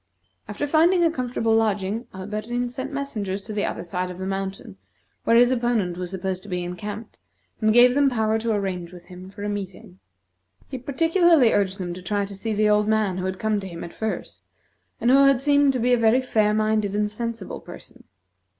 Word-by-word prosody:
After -, -, -3 dB
finding 335 Hz, +4 st, +3 dB
a 330 Hz, -, +3 dB
comfortable 245 Hz, -5 st, -1 dB
lodging, 215 Hz, 0 st, 0 dB
Alberdin 215 Hz, +6 st, -4 dB
sent 260 Hz, +3 st, -5 dB
messengers 220 Hz, -9 st, -3 dB
to 215 Hz, -, -7 dB
the 205 Hz, -1 st, -1 dB
other -, -, -4 dB
side 180 Hz, +1 st, -3 dB
of 180 Hz, -, -8 dB
the 190 Hz, -, -5 dB
mountain, 195 Hz, -, -5 dB, 0.5 s
where 230 Hz, -, +4 dB
his 245 Hz, +1 st, +6 dB
opponent 235 Hz, -8 st, 0 dB
was 180 Hz, 0 st, -5 dB
supposed 190 Hz, 0 st, -4 dB
to 205 Hz, -, -13 dB
be 180 Hz, -1 st, -2 dB
encamped, 205 Hz, +5 st, -7 dB, 0.4 s
and 215 Hz, -1 st, +3 dB
gave 245 Hz, +2 st, +6 dB
them 280 Hz, 0 st, +3 dB
power 220 Hz, -3 st, 0 dB
to 225 Hz, +1 st, -1 dB
arrange 185 Hz, -4 st, -2 dB
with 175 Hz, -1 st, -12 dB
him 185 Hz, +1 st, -11 dB
for 200 Hz, +1 st, -9 dB
a -, -, -2 dB
meeting. 190 Hz, -, -7 dB, 0.7 s
He 265 Hz, -, -5 dB
particularly 325 Hz, 0 st, +3 dB
urged 195 Hz, -1 st, +1 dB
them 180 Hz, -3 st, -4 dB
to 180 Hz, -, -9 dB
try 200 Hz, +2 st, -1 dB
to 200 Hz, -, -9 dB
see 210 Hz, +3 st, -4 dB
the 215 Hz, 0 st, +2 dB
old 210 Hz, 0 st, +3 dB
man 215 Hz, -4 st, +1 dB
who 185 Hz, -, -3 dB
had 190 Hz, 0 st, -3 dB
come 215 Hz, +1 st, 0 dB
to 195 Hz, -, -7 dB
him 170 Hz, -2 st, -8 dB
at 170 Hz, -, -8 dB
first, 220 Hz, -1 st, -5 dB, 0.6 s
and 240 Hz, -, +2 dB
who 270 Hz, -, +7 dB
had 275 Hz, -2 st, +4 dB
seemed 285 Hz, 0 st, +4 dB
to 255 Hz, -, -1 dB
be 245 Hz, +2 st, +2 dB
a 245 Hz, -, +3 dB
very 230 Hz, +2 st, +4 dB
fair 215 Hz, -5 st, +1 dB
minded 215 Hz, -2 st, 0 dB
and 210 Hz, 0 st, +1 dB
sensible 230 Hz, -1 st, -5 dB
person. -, -, -13 dB
215 Hz, 210 wpm, -24 LUFS, 190-245 Hz, 0.7 s, who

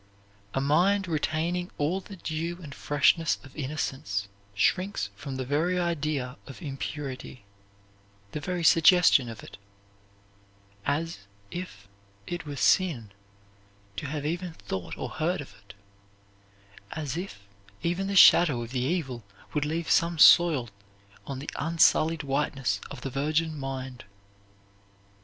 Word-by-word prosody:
A -, -, +2 dB
mind 180 Hz, +8 st, +3 dB
retaining 165 Hz, +3 st, -1 dB
all 165 Hz, +7 st, 0 dB
the 200 Hz, -, -11 dB
dew 170 Hz, 0 st, -4 dB
and 145 Hz, -3 st, -8 dB
freshness 145 Hz, +4 st, +2 dB
of 135 Hz, -, -15 dB
innocence 130 Hz, -9 st, -3 dB, 0.3 s
shrinks 185 Hz, -, +1 dB
from 130 Hz, +7 st, -6 dB
the 130 Hz, 0 st, -3 dB
very 160 Hz, +7 st, +1 dB
idea 150 Hz, -7 st, -1 dB
of 135 Hz, -, -10 dB
impurity, 135 Hz, -, -6 dB, 0.9 s
the -, -, -4 dB
very 175 Hz, +3 st, -3 dB
suggestion 165 Hz, -6 st, +6 dB
of 115 Hz, -1 st, -9 dB
it, -, -, -12 dB, 1.3 s
as 165 Hz, +4 st, -1 dB, 0.3 s
if 175 Hz, -, -7 dB, 0.4 s
it 175 Hz, +1 st, -5 dB
were 145 Hz, -, -5 dB
sin 140 Hz, -, +2 dB, 0.9 s
to 140 Hz, -, -3 dB
have 145 Hz, +1 st, -4 dB
even 175 Hz, +2 st, -3 dB
thought 95 Hz, -, -6 dB
or -, -, -4 dB
heard 175 Hz, +4 st, -1 dB
of 145 Hz, -, -9 dB
it, 100 Hz, 0 st, -16 dB, 1.2 s
as 150 Hz, -3 st, -4 dB
if 175 Hz, -, -6 dB, 0.4 s
even 175 Hz, +3 st, 0 dB
the 200 Hz, -, -2 dB
shadow 150 Hz, -9 st, +7 dB
of 115 Hz, -, -9 dB
the 130 Hz, -, -1 dB
evil 130 Hz, -5 st, -2 dB, 0.3 s
would 150 Hz, -1 st, 0 dB
leave 160 Hz, +2 st, -2 dB
some 170 Hz, 0 st, +3 dB
soil 150 Hz, -7 st, +6 dB, 0.6 s
on 135 Hz, -, -4 dB
the 140 Hz, +3 st, -6 dB
unsullied 160 Hz, 0 st, +3 dB
whiteness 135 Hz, -7 st, -1 dB
of 140 Hz, -, -8 dB
the 135 Hz, -, -4 dB
virgin 155 Hz, +4 st, 0 dB
mind. 130 Hz, -4 st, -6 dB
150 Hz, 130 wpm, -27 LUFS, 135-170 Hz, 1.3 s, shadow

